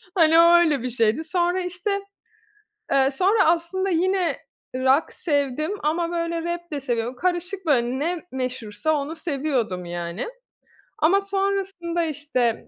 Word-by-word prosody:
Hani, 325 -1 +5
o 340 +1 +7
öyle 310 -7 +3
bir 255 - -2
şeydi. 230 +5 +1
Sonra, 350 +2 0
işte, 360 +3 -3 1.0
eee, 270 -1 +4
sonra 385 +8 +3
aslında 340 +3 +1
yine 365 +1 +1 0.4
rock 260 +4 +2
sevdim 290 0 -1
ama, 335 +3 0
böyle, 335 -1 -2
rap 345 -1 -10
de 285 - -2
seviyordum. 240 -1 -2
Karışık, 360 +3 -2
böyle, 255 -3 +2
ne 335 +3 -1
meşhursa 255 +1 -2
onu 295 +2 -2
seviyordum, 275 - -2
yani. 175 - -4 0.7
Ama 390 +6 +4
sonrasında, 390 -3 -1
işte, 280 -6 -1
320 Hz, 135 wpm, -23 LUFS, 260-350 Hz, 1.0 s, o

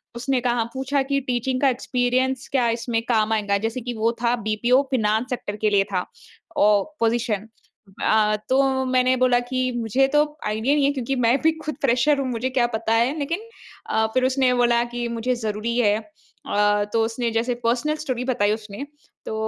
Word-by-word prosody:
उसने 250 +1 -1
कहा 240 -1 +1
पूछा 270 +2 0
कि 275 - +2
टीचिंग 255 0 -2
का 275 - +5
एक्सपीरियंस 255 +1 -1
क्या 255 -3 +2
इसमें 230 0 -1
काम 220 -1 +2
आएगा? 205 -2 +1
जैसे 225 +4 -3
कि 240 +1 -4
वो 225 +1 +1
था 240 0 +2
बीपीओ 235 +4 +2
फाइनेंस 220 -2 +1
सेक्टर 240 -5 -4
के 215 0 0
लिए 200 -1 +3
था 180 - 0 0.5
ओ 205 -4 +4 0.2
पोज़ीशन। 225 -2 0 0.6
अ, 215 -1 +3
तो 265 0 +2
मैंने 255 0 +2
बोला 250 -1 +3
कि 255 -1 0
मुझे 240 +4 +2
तो 295 0 +5 0.2
आइडिया 220 +5 0
ही - - +3
नहीं 285 - +3
है 280 - +3
क्योंकि 265 0 -2
मैं 240 +4 +4
भी 320 - +4
खुद 305 - -3
फ़्रेशर 275 +3 +2
हूँ 270 - -1
मुझे 245 +1 -2
क्या 250 -2 +1
पता 225 0 -1
है। 240 +7 +2
लेकिन 330 +7 -2 0.5
अ, 220 - +2
फ़िर 255 0 +2
उसने 260 -1 +2
बोला 240 -1 +3
कि 240 0 -2
मुझे 235 +2 -1
ज़रूरी 220 0 -3
हैं। 210 -3 +3
अ, 205 -1 -2
तो 225 - +3
उसने 230 +1 -2
जैसे 235 +2 0
पर्सनल 250 +6 +1
स्टोरी 250 -3 -2
बताई 240 -6 +1
उसने। 215 +4 -7 0.4
तो - - -4
240 Hz, 190 wpm, -23 LUFS, 220-260 Hz, 0.6 s, का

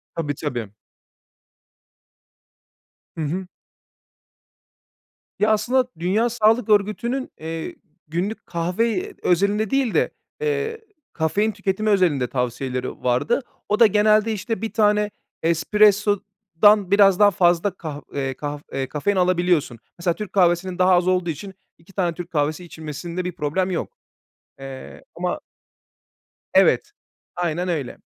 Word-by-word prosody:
Tabii, 150 -3 -2
tabii. 120 -10 -4 2.4
Hı - - -3
hı. 180 +5 -3 1.9
Ya, 210 - +3
aslında, 250 +4 +2
Dünya 210 +7 +1
Sağlık 225 0 +2
Örgütü'nün, 215 +6 +1
eee, 160 +1 -5 0.3
günlük 180 +7 -3
kahve 230 - -1
özelinde 200 +4 +2
değil 270 -4 +1
de, - - +2 0.3
eee, 450 0 -1 0.3
kafein 200 +7 +1
tüketimi 200 +1 -1
özelinde 170 -11 +2
tavsiyeleri 125 0 -3
vardı. 130 - +1 0.3
O 210 - +1
da 230 - +9
genelde, 215 +2 +3
işte, 220 +2 -3
1 225 - -4
tane 210 -1 +3 0.3
espressodan 205 +2 +3
biraz 200 -1 +5
daha 205 -1 +6
fazla 175 +2 +2
kah 155 -5 -7
eee, 135 -1 -2
kaf 145 +2 -5
e 135 -1 -3
kafein 195 +7 -1
alabiliyorsun. 175 -9 +1 0.2
Mesela, 170 0 +1
Türk 210 -2 -7
kahvesinin 180 0 +2
daha 185 0 +5
az 175 0 +3
olduğu 180 -2 +1
için 190 +6 -6 0.2
2 165 +4 -20
tane 175 -4 0
Türk 175 +1 -8
kahvesi 155 +3 -1
içilmesinde 170 +3 -6
bir 180 - -2
problem 180 +6 -1
yok. 175 - -4 0.6
Eee, 135 -1 -9
ama - - -2 1.1
Evet, - - +4 0.4
aynen 175 0 -1
öyle. 150 -8 -3
185 Hz, 120 wpm, -22 LUFS, 160-210 Hz, 2.4 s, da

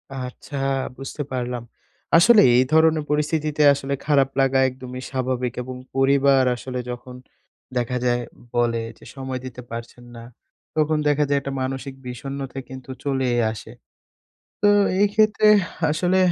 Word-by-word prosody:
আচ্ছা। 130 +2 -7 0.4
বুঝতে 135 +3 -6
পারলাম। 125 -1 -3 0.5
আসলে 210 +5 +7
এই 125 - +5
ধরনের 160 -1 +4
পরিস্থিতিতে 150 0 0
আসলে, 140 0 -3
খারাপ 140 -3 +3
লাগা 135 0 +3
একদমই 130 0 -8
স্বাভাবিক। 130 -2 -1
এবং 130 +1 -7 0.2
পরিবার 135 0 +4
আসলে 125 +1 -5
যখন, 125 +1 -8 0.6
দেখা 125 +1 -1
যায় 120 0 +2 0.3
বলে 120 -1 +1 0.2
যে - - -17
সময় 130 -1 -4
দিতে 125 -1 -8
পারছেন 115 +1 -8
না। 115 - -9 0.5
তখন 155 0 +2
দেখা 150 0 +3
যায় 140 0 +3
একটা 135 0 -5
মানসিক 135 +1 -4
বিষণ্নতা 135 +1 -6
কিন্তু 130 0 -10
চলেই 130 -3 0
আসে। 110 - -9 0.9
তো - - +5 0.3
এই 205 - +6
ক্ষেত্রে 215 0 +3 0.4
আসলে, 180 +4 +1
135 Hz, 135 wpm, -22 LUFS, 125-145 Hz, 0.9 s, আসলে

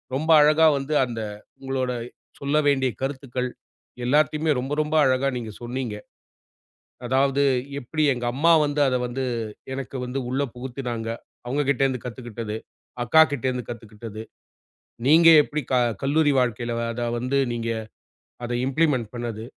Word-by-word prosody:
ரொம்ப 155 +4 -2
அழகா 155 +2 +5
வந்து 140 +3 -3
அந்த 115 -2 -6 0.4
உங்களோட 130 -1 -2 0.5
சொல்ல 140 +2 -1
வேண்டிய 135 -2 +3
கருத்துக்கள் 130 -2 -3 0.6
எல்லாத்தையுமே 150 +3 +2
ரொம்ப 135 +3 -3
ரொம்ப 150 +1 -2
அழகா 130 +1 +2
நீங்கச் 110 -3 -7
சொன்னீங்க. 120 -3 -4 1.1
அதாவது 135 +2 +2 0.4
எப்டி 155 +4 -2
எங்க 120 -1 -4
அம்மா 165 +5 +3
வந்து 145 0 -2
அத 130 - +1
வந்து 130 +2 -3 0.5
எனக்கு 135 0 -6
வந்து 125 +2 -3
உள்ள 130 +2 0
புகுத்துனாங்க. 125 -3 -5 0.4
அவங்க 140 +4 0
கிட்டந்து 135 -2 +1
கத்துக்கிட்டது. 115 -3 -6 0.5
அக்கா 160 +6 +6
கிட்டந்து 130 -3 -1
கத்துக்கிட்டது. 110 -1 -8 0.9
நீங்க 165 +3 +7
எப்டி 150 +1 -3
க - - +3 0.3
கல்லூரி 145 +2 +3
வாழ்க்கையில 120 -1 -1 0.2
அதா 120 +1 -3
வந்து 125 +3 0 0.2
நீங்க 115 -1 -3 0.8
அத 120 - -5 0.2
இம்பிலிமெண்ட் 135 -5 +1
பண்ணுது. 115 -2 -5
130 Hz, 130 wpm, -24 LUFS, 120-145 Hz, 1.1 s, நீங்க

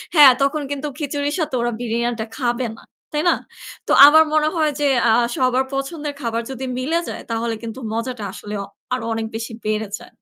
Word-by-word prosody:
হ্যাঁ, 290 -4 +10
তখন 295 +2 +1
কিন্তু 285 +1 -3
খিচুড়ির 290 +1 -2
সাথে 305 -5 -1
ওরা 240 0 0
বিরিয়ানিটা 235 -1 -1
খাবে 245 -1 0
না, - - -16 0.3
তাই 300 - +1
না? - - +4 0.5
তো - - 0 0.2
আমার 315 +2 +7
মনে 310 0 +3
হয় 310 -2 +2
যে 290 - +3 0.2
আ - - +6 0.2
সবার 255 0 +2
পছন্দের 290 +2 -3
খাবার 230 -1 -1
যদি 265 0 -5
মিলে 320 +6 0
যায় - - -6
তাহলে 230 0 -1
কিন্তু 230 +3 -6
মজাটা 230 -1 -3
আসলে 210 +1 -8
অ - - -7 0.3
আরো 250 -3 -2
অনেক 225 0 -2
বেশি 225 0 -5
বেড়ে 215 0 -1
যায়। - - -13
255 Hz, 195 wpm, -21 LUFS, 230-290 Hz, 0.5 s, হ্যাঁ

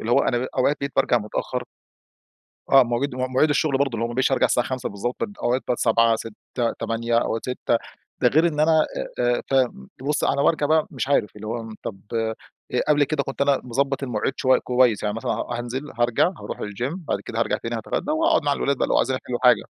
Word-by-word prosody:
اللي 115 - -3
هو - - +5
أنا 120 - +1
بقي 130 - -3
أوقات 140 +3 +3
بقيت 140 0 -3
بارجع 120 - +3
متأخر. 105 -1 -3 1.1
آه 135 -1 +9
مواجيد 125 +3 -1
مواعيد 130 +4 +1
الشغل 145 -2 +1
برضو 140 -1 +2
اللي 115 +1 -1
هو - - -1
ما 120 - -6
بقيتش 130 +1 +2
أرجع - - +3
الساعة 120 -1 +1
17:00 130 -1 -3
بالضبط 100 +5 -4 0.3
أوقات 125 +2 +1
بقت 125 - 0
19:00 115 0 +3
18:00 115 +2 -4
20:00 115 +1 0
أوقات 115 -1 -1
18:00 125 - -1 0.5
ده - - +5
غير 160 +3 +4
إن 150 -2 -2
أنا 160 0 +4 0.3
آآ، 120 0 +2
آآ - - -4
ف 135 - +1 0.5
بصّي 145 0 +1
أنا 140 - +1
بارجع 155 -3 +2
بقى 155 +1 +3
مش 135 - -3
عارف 105 -7 +1
اللي 105 +1 -8
هو 115 +1 -3
م 110 -1 -8
طب 95 - -6
آآ 110 0 0 0.5
قبل 145 -1 +4
كده 140 0 -1
كنت 135 0 -7
أنا 140 -1 +3
مضبط 135 +3 -1
المواعيد 125 0 -1
شوي 130 0 +3
كويس 125 -4 +2
يعني 105 0 -1
مثلًا 115 - -2
ها 120 0 -3
هانزل، 130 +5 -5
هارجع، 120 +6 +3
هاروح - - -6
الgym 120 - -3
بعد - - 0
كده - - -6
هارجع - - +1
تاني - - -4
هاتغدى - - -3
وهاقعد 320 - +3
مع 145 - +2
الولاد 140 -1 0
بقى - - 0
لو - - +2
عايزين 130 +1 +1
يحلوا 120 -1 -3
حاجة. 125 -4 +5
125 Hz, 225 wpm, -23 LUFS, 115-140 Hz, 1.1 s, آه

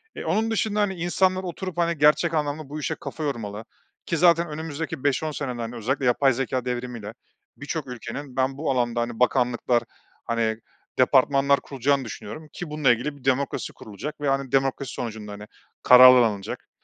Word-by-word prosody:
Eee, - - -6
onun 215 +7 0
dışında, 210 0 0
hani, 200 -2 0
insanlar 185 +2 +1
oturup, 185 0 -6
hani, 170 -1 +1
gerçek 150 +3 +4
anlamda 150 -1 -2
bu 150 +2 -5
işe 150 - -2
kafa 155 - -7
yormalı. 110 -6 -4 0.4
Ki 165 - -1
zaten 170 0 +4
önümüzdeki 160 0 -5
5-10 145 +2 0
senede 125 -5 -4
hani 115 +1 -5
özellikle 130 +4 -2
yapay 130 +2 +3
zekâ 130 0 -2
devrimi 125 -1 -4
ile 105 +1 -8 0.4
birçok 145 0 -4
ülkenin 125 +2 -7
ben 135 +1 0
bu 155 -1 -1
alanda, 120 -2 0
hani, 120 -1 -4
bakanlıklar, 125 -1 +2 0.4
hani, 115 -1 0 0.4
departmanlar 140 +2 +4
kurulacağını 135 0 0
düşünüyorum 150 +7 -8
ki 175 - -6
bununla 150 -4 +3
ilgili 135 +5 -2
bir 130 - -19
demokrasi 135 +1 0
kurulacak 145 +9 -8
ve, 145 - 0
hani, 135 -1 -1
demokrasi 135 -1 0
sonucunda, 110 -3 -6
hani, 105 +1 -9 0.4
kararlar 125 0 +9
alınacak, 100 -3 -3
135 Hz, 170 wpm, -24 LUFS, 120-155 Hz, 0.4 s, kararlar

